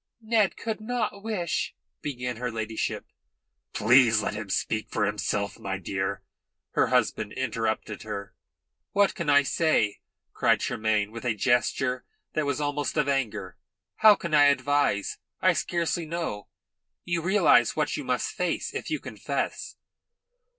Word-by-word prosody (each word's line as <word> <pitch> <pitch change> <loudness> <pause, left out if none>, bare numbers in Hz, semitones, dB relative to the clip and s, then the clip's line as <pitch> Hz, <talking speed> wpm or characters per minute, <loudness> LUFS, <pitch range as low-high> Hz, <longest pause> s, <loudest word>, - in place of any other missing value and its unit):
"Ned 220 -3 +1
could 220 -1 -4
not 225 -3 -2
wish 200 -6 -2
" - - -55
began 125 -4 -4
her 125 +1 -2
ladyship. 110 -1 -3 0.7
"Please 115 0 +5
let 105 - -2
him 105 -1 -6
speak 110 +3 -1
for 105 - 0
himself, 100 0 -2
my 95 -1 -3
dear," 95 +1 -3 0.5
her - - +2
husband 105 - +1
interrupted 115 -4 -2
her. 105 -1 -6 0.6
"What 200 0 +3
can 170 -4 -3
I 145 0 +6
say?" 140 -8 +1 0.3
cried - - +3
Tremayne, 110 -1 0
with 115 +1 -8
a 120 -3 0
gesture 125 +2 +1 0.3
that 155 -2 0
was 140 - -1
almost 145 +1 -2
of 150 -2 +2
anger. 110 -10 -2 0.4
"How 215 -1 +8
can 170 -4 -6
I 145 -1 +7
advise? 145 -6 +2 0.2
I - - +4
scarcely 170 -1 -1
know. 165 -11 -4 0.6
You 175 -1 0
realise 190 +5 +4
what - - 0
you - - -4
must - - -1
face - - -2
if - - -4
you - - -1
confess?" - - -4
125 Hz, 145 wpm, -27 LUFS, 110-165 Hz, 0.7 s, How